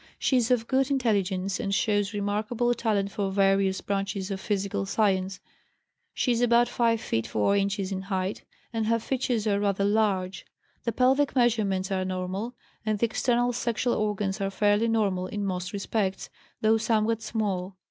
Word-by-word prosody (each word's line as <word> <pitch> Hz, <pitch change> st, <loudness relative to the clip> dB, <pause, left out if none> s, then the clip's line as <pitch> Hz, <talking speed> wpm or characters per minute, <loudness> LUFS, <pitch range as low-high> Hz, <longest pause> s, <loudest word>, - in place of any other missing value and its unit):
She 260 Hz, -, +2 dB
is 235 Hz, -2 st, +1 dB
of 235 Hz, -2 st, +2 dB
good 270 Hz, 0 st, +2 dB
intelligence, 195 Hz, -8 st, 0 dB
and 195 Hz, 0 st, -1 dB
shows 205 Hz, -1 st, +1 dB
remarkable 215 Hz, +4 st, 0 dB
talent 210 Hz, -4 st, 0 dB
for 200 Hz, -2 st, -2 dB
various 195 Hz, 0 st, +2 dB
branches 195 Hz, 0 st, -2 dB
of 190 Hz, -1 st, -4 dB
physical 200 Hz, -1 st, -1 dB
science. 190 Hz, -3 st, +1 dB, 0.7 s
She 250 Hz, -, 0 dB
is 235 Hz, 0 st, +1 dB
about 240 Hz, 0 st, +4 dB
5 230 Hz, -1 st, +1 dB
feet 115 Hz, -, -2 dB
4 110 Hz, -, +1 dB
inches 200 Hz, -1 st, 0 dB
in 190 Hz, -1 st, -2 dB
height, 190 Hz, 0 st, -3 dB, 0.3 s
and 225 Hz, -1 st, -1 dB
her 230 Hz, +1 st, +3 dB
features 240 Hz, -2 st, -1 dB
are 200 Hz, -2 st, +2 dB
rather 200 Hz, -1 st, +1 dB
large. 200 Hz, -3 st, +1 dB, 0.4 s
The 230 Hz, -, +1 dB
pelvic 265 Hz, +5 st, +2 dB
measurements 210 Hz, -6 st, +1 dB
are 190 Hz, -1 st, 0 dB
normal, 185 Hz, +5 st, -3 dB, 0.3 s
and 215 Hz, -1 st, 0 dB
the 235 Hz, -, +2 dB
external 245 Hz, +2 st, +1 dB
sexual 235 Hz, 0 st, 0 dB
organs 205 Hz, -1 st, -1 dB
are 195 Hz, -, 0 dB
fairly 205 Hz, +3 st, +2 dB
normal 200 Hz, -5 st, +1 dB
in 205 Hz, +1 st, -3 dB
most 180 Hz, -1 st, -3 dB
respects, 200 Hz, -1 st, -2 dB, 0.3 s
though 220 Hz, +1 st, +4 dB
somewhat 225 Hz, 0 st, +1 dB
small. 200 Hz, -4 st, -2 dB
205 Hz, 165 wpm, -27 LUFS, 195-230 Hz, 0.7 s, about